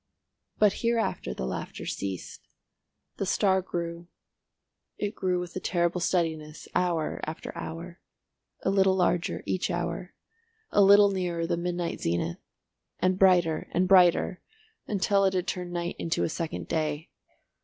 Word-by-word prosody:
But 210 -2 +5
hereafter 230 - 0
the 65 - -3
laughter 65 - -5
ceased. 95 -2 -5 0.7
The 195 - -1
star 190 -1 +3
grew—it 170 +4 -8
grew 180 -4 0
with 175 -1 -6
a - - -1
terrible 175 -1 0
steadiness 160 -4 -1
hour 170 -3 0
after 155 +1 -6
hour, 170 +2 -7 0.6
a 190 - +2
little 190 -1 +4
larger 180 -1 0
each 185 - -1
hour, - - -3 0.6
a 205 - +4
little 200 +1 +7
nearer 175 -3 -1
the 170 +1 0
midnight 175 0 -3
zenith, 85 0 -1 0.6
and 185 0 +1
brighter 175 -4 +4
and 185 +1 +2
brighter, 180 -1 +5 0.5
until 200 0 +2
it 190 0 +2
had 180 -1 0
turned 180 -2 -3
night 175 0 -3
into 165 - 0
a - - 0
second 165 0 -4
day. 155 -1 -2
175 Hz, 135 wpm, -28 LUFS, 165-190 Hz, 0.7 s, little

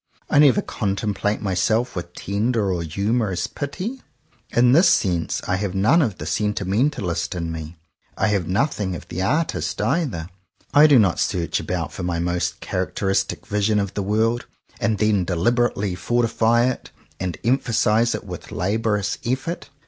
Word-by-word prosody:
I 145 - +5
never 145 -5 +5
contemplate 105 +1 -2
myself 110 +6 +1
with 90 -1 -6
tender 105 0 0
or 85 - -2
humorous 100 +5 -1
pity. 180 - -5 0.5
In 120 +1 +4
this 165 +8 +6
sense 85 -4 +1
I 90 - +1
have 100 -1 -3
none 110 - +4
ofthe 120 - -1
sentimentalist 105 - -1
in 85 -1 -3
me. 80 +1 -7 0.4
I 110 - +2
have 100 -5 0
nothing 100 -2 0
of - - -9
the 95 - -3
artist 150 - -1
either. 135 - -1 0.5
I 150 +1 +8
do 145 -3 +6
not 100 -6 +3
search 85 -3 0
about - - -3
for - - -6
my 90 -1 -1
most 85 0 -1
characteristic 95 0 -1
vision 105 +1 +1
of 100 -1 -2
the 105 - -2
world, 110 +4 0 0.3
and 110 -2 +1
then 105 -3 +2
deliberately 100 +3 +1
fortify 120 +2 +2
it 130 -1 -2 0.3
and 90 -4 -3
emphasize 115 -2 +2
it - - -6
with - - -9
laborious 105 +1 -1
effort. 135 +7 -3
105 Hz, 150 wpm, -22 LUFS, 90-120 Hz, 0.5 s, I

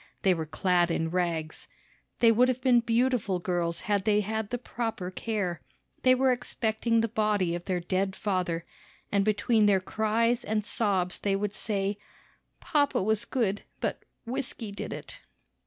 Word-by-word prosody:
They 190 - +5
were 160 -2 -3
clad 175 +2 +2
in 165 -1 -1
rags. 170 -3 -2 0.5
They 230 -1 +7
would 245 +3 +4
have 255 -1 0
been 255 -2 +4
beautiful 235 -4 +1
girls 175 -2 -1
had 205 -2 0
they 210 0 +3
had 220 0 -3
the 245 - -1
proper 225 -6 -4
care. 190 -4 -2 0.4
They 255 0 +5
were 260 0 +3
expecting 230 -1 0
the 230 - +1
body 210 -5 +1
of 175 0 -5
their 180 -2 -1
dead 190 +2 -1
father, 180 -4 -1 0.5
and 200 -1 +3
between 215 +1 +3
their 195 -2 +4
cries 225 +5 0
and 215 -1 -1
sobs 190 -6 0
they 200 -1 0
would 205 0 -2
say, 200 -1 -2 0.6
"Papa 285 - +1
was 220 +2 +1
good, 215 -6 0 0.2
but - - -2 0.2
whisky 240 -3 -3
did 200 - -6
it." - - -7
210 Hz, 160 wpm, -28 LUFS, 185-230 Hz, 0.6 s, They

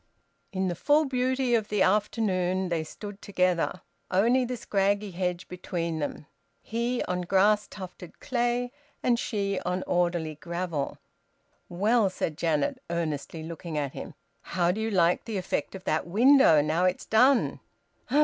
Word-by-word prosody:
In 190 -1 -1
the 175 - 0
full 295 - +3
beauty 260 -1 0
of 220 -3 +2
the 210 -2 +2
afternoon 190 -3 +1
they 165 -2 0
stood 205 +5 -9
together, 185 -3 0 0.3
only 235 +7 +3
the 250 0 -4
scraggy 200 -1 0
hedge 180 0 -2
between 170 -3 -3
them, 145 0 -4 0.4
he 235 +2 -1
on 180 0 -2
grass 205 +4 +3
tufted 185 -2 -10
clay, 245 0 -1 0.3
and 240 -2 +3
she 200 -5 -1
on 180 +1 -1
orderly 175 -3 0
gravel. 170 -1 -4 0.7
"Well," 205 +4 +2
said 165 -4 -3
Janet, 170 - 0
earnestly 160 -1 -3
looking 165 0 -6
at 140 -2 -2
him, - - -8 0.3
"how 175 -1 0
do 210 +4 -3
you 220 - -1
like 180 -4 +2
the 220 -3 -3
effect 190 +1 -2
of 190 - -9
that 155 0 -1
window, 225 - +6
now 160 +4 +1
it's 185 +1 0
done?" 250 +4 +3
185 Hz, 150 wpm, -27 LUFS, 170-220 Hz, 0.7 s, window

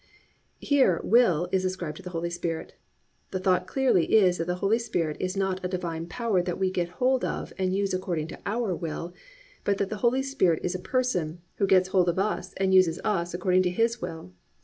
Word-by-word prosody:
"+ - - -41
Here 265 - +3
will 185 -7 +4
is 190 -1 +1
ascribed 180 -5 -3
to - - -10
the 180 - -7
Holy 170 0 -3
Spirit. 170 -1 -4 0.6
The - - -3
thought 185 -1 +1
clearly 245 -6 +2
is 185 -5 +4
that 165 - -2
the 180 - 0
Holy 200 +5 +1
Spirit 165 -10 -2
is 185 +1 -2
not 190 -1 -1
a - - 0
divine 170 -3 -4
power 225 -3 0
that 175 0 -3
we 190 -1 0
get 175 -2 -1
hold 255 0 +2
of - - -3
and 185 0 0
use 200 -1 0
according 175 -4 -2
to - - -9
our 215 -1 -1
will, 170 +1 -5 0.5
but 200 -1 +1
that 200 -1 -2
the 215 - -3
Holy 255 +2 +2
Spirit 230 - +2
is 180 - -1
a 185 - -3
person 180 -9 -1 0.2
who 200 - +2
gets 185 -1 +4
hold 180 -2 +3
of 175 - -1
us 190 -2 -2
and 190 0 +1
uses 180 -3 +4
us 175 -5 -1
according 185 +1 +2
to 180 - +1
His 230 +5 0
will. 160 - -7
185 Hz, 215 wpm, -27 LUFS, 175-200 Hz, 0.6 s, will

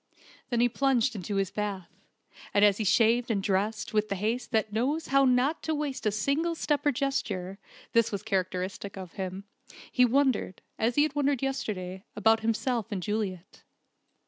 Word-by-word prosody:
Then 240 -2 +1
he 245 - +5
plunged 255 -1 +1
into 200 +1 -4
his 195 0 0
bath, 200 -4 -4 0.6
and 205 +1 +6
as 205 -1 +4
he 220 - -1
shaved 230 +4 +3
and 200 -4 0
dressed 205 +4 -1
with 215 0 +1
the 200 - -1
haste 220 +6 -2
that 220 -3 0
knows 280 +9 -1
how 275 0 +5
not 255 +5 +2
to 315 - -1
waste 285 -6 -2
a - - +3
single 280 +11 0
step 295 -2 0
or - - +5
gesture 200 -9 -2 0.3
(this 230 -1 +3
was 200 -1 -4
characteristic 190 -1 -2
of 185 -3 -8
him) 190 0 -5 0.5
he 250 - +4
wondered, 255 -6 +1 0.2
as 230 +2 +1
he 290 - +5
had 305 -2 -1
wondered 285 -2 +1
yesterday, 195 -9 -3
about 220 +2 +4
himself 230 +1 -1
and 190 -3 -3
Juliet. 195 -3 -4
220 Hz, 175 wpm, -28 LUFS, 200-265 Hz, 0.6 s, and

